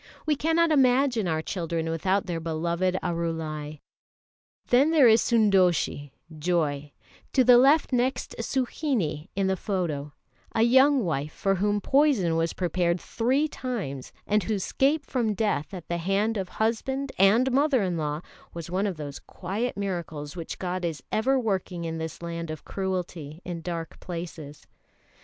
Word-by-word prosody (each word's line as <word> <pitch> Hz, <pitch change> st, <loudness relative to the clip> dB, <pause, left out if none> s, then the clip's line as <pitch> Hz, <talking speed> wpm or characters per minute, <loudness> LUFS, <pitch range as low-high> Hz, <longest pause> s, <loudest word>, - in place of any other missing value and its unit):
We 305 Hz, -1 st, +2 dB
cannot 325 Hz, +3 st, +2 dB
imagine 255 Hz, -6 st, +3 dB
our 160 Hz, -1 st, -1 dB
children 165 Hz, -3 st, -3 dB
without 185 Hz, +5 st, 0 dB
their 170 Hz, -2 st, -3 dB
beloved 170 Hz, +3 st, -1 dB
Arulai. 160 Hz, -3 st, -3 dB, 0.9 s
Then 265 Hz, +5 st, +5 dB
there 305 Hz, -6 st, +6 dB
is 225 Hz, 0 st, +6 dB
Sundoshie 185 Hz, -, +2 dB, 0.3 s
(Joy), 150 Hz, -4 st, 0 dB, 0.4 s
to 260 Hz, -, +5 dB
the 245 Hz, 0 st, +7 dB
left 280 Hz, +2 st, +4 dB
next 250 Hz, +1 st, 0 dB
Suhinie 230 Hz, -, -1 dB
in 195 Hz, 0 st, +1 dB
the 190 Hz, 0 st, +1 dB
photo, 170 Hz, -8 st, -3 dB, 0.4 s
a 225 Hz, -, +4 dB
young 265 Hz, +2 st, +5 dB
wife 150 Hz, -2 st, -2 dB
for 195 Hz, -, 0 dB
whom 205 Hz, +2 st, 0 dB
poison 265 Hz, -, +3 dB
was 165 Hz, 0 st, 0 dB
prepared 175 Hz, 0 st, 0 dB
three 260 Hz, -, 0 dB
times, 205 Hz, -, -5 dB
and 210 Hz, +1 st, +2 dB
whose 200 Hz, 0 st, -2 dB
escape 285 Hz, +3 st, +1 dB
from 230 Hz, -5 st, -1 dB
death 205 Hz, -8 st, -1 dB
at 180 Hz, -4 st, -8 dB
the 170 Hz, -, -1 dB
hand 195 Hz, +6 st, 0 dB
of 190 Hz, -3 st, -3 dB
husband 265 Hz, +5 st, -1 dB
and 225 Hz, +7 st, +5 dB
mother 275 Hz, -3 st, +3 dB
in 180 Hz, -2 st, -1 dB
law 150 Hz, -1 st, -2 dB, 0.3 s
was 170 Hz, 0 st, -6 dB
one 195 Hz, +3 st, +1 dB
of 185 Hz, -5 st, -4 dB
those 145 Hz, -2 st, -6 dB
quiet 205 Hz, +7 st, -4 dB
miracles 170 Hz, -7 st, -4 dB
which 170 Hz, -2 st, -6 dB
God 180 Hz, 0 st, -3 dB
is 165 Hz, -3 st, -3 dB
ever 265 Hz, +5 st, +2 dB
working 190 Hz, -6 st, -2 dB
in 165 Hz, 0 st, -3 dB
this 160 Hz, +1 st, -6 dB
land 170 Hz, -1 st, -5 dB
of 155 Hz, -1 st, -7 dB
cruelty 180 Hz, -5 st, -4 dB
in 175 Hz, -2 st, -5 dB
dark 165 Hz, -1 st, -5 dB
places. 165 Hz, -4 st, -7 dB
185 Hz, 155 wpm, -26 LUFS, 165-240 Hz, 0.9 s, the